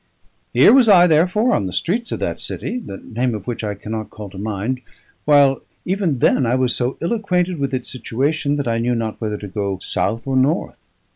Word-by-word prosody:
Here - - +6
was 255 -4 +6
I, 180 -3 +8
therefore, 180 +9 +3
on 95 - 0
the - - -5
streets 225 - -2
of - - -3
that - - -2
city, 250 - -4
the 100 - -8
name 120 +2 -2
of 100 -3 -7
which 120 -2 -4
I 105 -1 -2
cannot 110 +2 -5
call 105 -3 -9
to 95 - -11
mind, 110 +5 -3 0.4
while 140 -2 +5 0.2
even 185 -6 0
then 130 - +3
I 120 +1 +1
was 130 -1 +1
so 125 +1 -2
ill 170 +7 0
acquainted 180 -6 0
with 140 -1 -1
its 130 -2 -3
situation 140 +5 -1
that 145 -3 -2
I 115 0 0
knew 120 +1 0
not 115 -1 -3
whether 105 -2 -2
to 105 - -8
go 100 0 -3
south 115 +4 -2
or 135 -1 -1
north. 135 +6 +1
130 Hz, 215 wpm, -20 LUFS, 110-165 Hz, 0.4 s, I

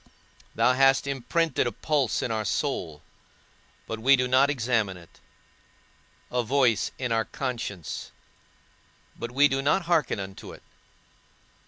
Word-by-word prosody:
Thou 125 - +3
hast 135 +1 +4
imprinted 140 +1 0
a - - -1
pulse 140 +2 0
in 125 - -2
our 110 -1 -1
soul, 95 - -3 0.8
but 110 - -5
we 135 +5 +5
do 125 -1 0
not 130 +3 +4
examine 115 -8 0
it; 85 -2 -18 1.1
a 125 - +1
voice 120 -2 +2
in 125 -2 -3
our 115 -1 +1
conscience, 115 - -5 1.1
but 120 - -6
we 140 +4 +4
do 135 -1 -1
not 145 +7 +2
hearken 165 - +1
unto 95 0 -8
it. - - -14
125 Hz, 135 wpm, -26 LUFS, 110-140 Hz, 1.1 s, we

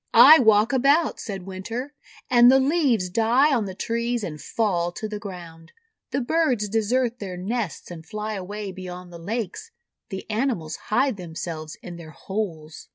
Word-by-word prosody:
"I 315 - +10
walk 220 0 +4
about," 280 +5 +3
said 195 -4 -6
Winter, 230 +9 -5 0.3
"and 245 0 +7
the 265 - +6
leaves 265 - +2
die 235 +9 +3
on 230 -5 +1
the 190 -1 -6
trees, 235 +2 -2
and 150 -6 -5
fall 175 -2 0
to 215 - -5
the 210 -1 -5
ground. 170 -5 -10 0.4
The 270 - -1
birds 255 -6 +1
desert 235 +3 0
their 185 -3 -6
nests 200 -1 -4
and 165 -2 -8
fly 215 +3 -5
away 200 +1 -5
beyond 180 -1 -9
the 170 - -9
lakes. 225 - -4 0.4
The 190 - -6
animals 215 - -1
hide 260 +1 +2
themselves 160 -3 -6
in 175 -1 -8
their 165 -2 -10
holes." 165 -4 -5
210 Hz, 160 wpm, -24 LUFS, 180-240 Hz, 0.4 s, I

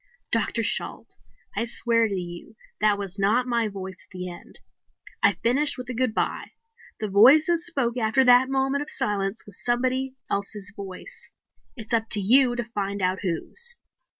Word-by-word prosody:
"Dr. - - +1
Shalt, - - -3 0.4
I 230 - 0
swear 230 -1 +2
to 200 - -3
you 175 +3 -7 0.2
that 210 -1 +3
was 200 -1 -6
not 215 +6 +2
my 235 -2 0
voice 190 -3 -8
at - - -25
the 180 -1 -6
end. 175 - -13 0.6
I - - +5
finished 280 +6 0
with 250 0 -6
a - - -4
goodbye. 245 -2 -1 0.5
The 215 - -2
voice 245 +11 +7
that 340 -1 +2
spoke 275 -8 0
after 225 +3 +3
that 250 +1 +6
moment 270 +1 0
of 295 - -6
silence 200 0 -2
was 200 -2 -9
somebody 255 +2 0
else's 200 0 -2
voice. 195 - -8 0.5
It's 225 -2 -5
up 225 -1 +1
to 210 - +3
you 245 +5 +5
to 240 - -2
find 200 -3 -4
out 185 0 0
whose." 470 - -2
225 Hz, 170 wpm, -25 LUFS, 200-255 Hz, 0.6 s, voice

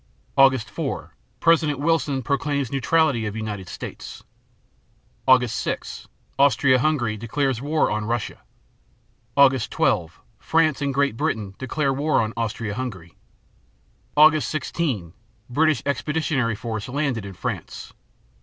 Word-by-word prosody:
Aug. 135 -1 +6
4 110 - -5 0.3
President 160 -4 +3
Wilson 145 -3 0
proclaims 140 -1 -1
neutrality 135 -4 +2
of 105 - -5
United 105 -4 -5
States. - - -8 1.0
Aug. 130 -2 +6
6 - - -4 0.3
Austria 135 -2 +4
Hungary 125 -6 +1
declares 125 +2 -1
war 150 +3 +1
on 105 0 -2
Russia. 115 0 -3 1.0
Aug. 135 -2 +5
12 85 0 0 0.2
France 160 -3 +1
and 140 -1 0
Great 140 -3 +1
Britain 105 -3 -2
declare 135 +2 -1
war 145 +3 +1
on 110 0 -1
Austria 110 -1 -3
Hungary. 100 -9 -6 1.0
Aug. 155 +1 +7
16 135 - -2 0.4
British 155 +3 +2
expeditionary 140 -3 0
force 110 +1 -5
landed 135 -5 -1
in 100 -1 -8
France. - - -6
130 Hz, 115 wpm, -23 LUFS, 110-145 Hz, 1.0 s, Aug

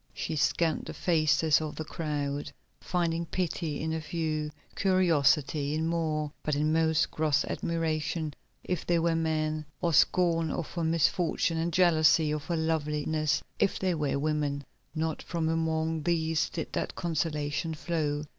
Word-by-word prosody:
She 160 - -3
scanned 160 +2 +1
the - - -6
faces 155 -2 +3
of 155 -1 -4
the 155 - -5
crowd, 145 -3 -3 0.3
finding 170 -2 -1
pity 165 -4 -2
in 160 +1 -2
a 160 - -2
few, 155 -1 -2 0.3
curiosity 155 -6 +2
in 160 +1 0
more, 155 -3 -1
but 150 - -1
in 155 +2 +1
most 160 -2 +2
gross 155 -3 +1
admiration 160 -1 -2 0.3
if 180 -3 -2
they 175 - +2
were 165 0 +2
men, 155 -1 0 0.2
or 170 -1 0
scorn 165 0 +3
of 165 +1 -3
her 170 - -3
misfortune 165 +1 +1
and 170 +1 0
jealousy 160 -2 +4
of 150 -1 -3
her 170 -2 -1
loveliness 155 -1 0 0.2
if - - +2
they 185 -1 0
were 150 -4 0
women. 145 -1 -1 0.3
Not 160 0 -1
from 165 -2 -2
among 160 0 0
these 160 0 +1
did 165 - -5
that - - -2
consolation 160 -1 -1
flow. 150 -3 -1
160 Hz, 150 wpm, -29 LUFS, 150-165 Hz, 0.3 s, jealousy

